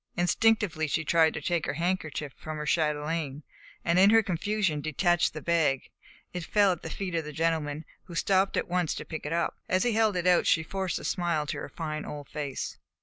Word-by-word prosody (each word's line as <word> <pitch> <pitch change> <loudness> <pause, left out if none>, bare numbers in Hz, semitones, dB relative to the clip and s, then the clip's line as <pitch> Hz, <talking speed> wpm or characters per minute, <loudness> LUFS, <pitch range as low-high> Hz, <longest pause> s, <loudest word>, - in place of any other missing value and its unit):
Instinctively 180 -3 +2
she 160 +2 -1
tried 160 0 +4
to - - -4
take 170 -3 -1
her 140 - -2
handkerchief 160 -4 -2
from 155 0 -6
her 150 - -4
chatelaine, 150 -2 -1 0.4
and 170 +2 +3
in 195 +2 +7
her 225 +1 +6
confusion 190 -3 0
detached 175 +4 +2
the 155 - -7
bag. 160 -6 +1 0.4
It 180 -1 -4
fell 200 +3 +3
at 175 - -3
the - - -6
feet 190 -3 -4
of 165 -1 0
the 150 - -7
gentleman, 155 -1 -1 0.2
who 175 - -10
stooped 190 +3 +2
at - - 0
once 175 -2 0
to - - -6
pick 160 -2 -6
it - - -4
up. 170 0 0
As 185 0 +2
he 245 - +2
held 220 -2 +2
it 180 -1 -1
out, 180 -1 +4
she 160 - +4
forced 190 +2 -2
a - - -8
smile 170 -4 0
to - - -4
her - - -6
fine 155 -2 -4
old 145 -2 -8
face. 145 -3 -4
165 Hz, 215 wpm, -28 LUFS, 155-185 Hz, 0.4 s, in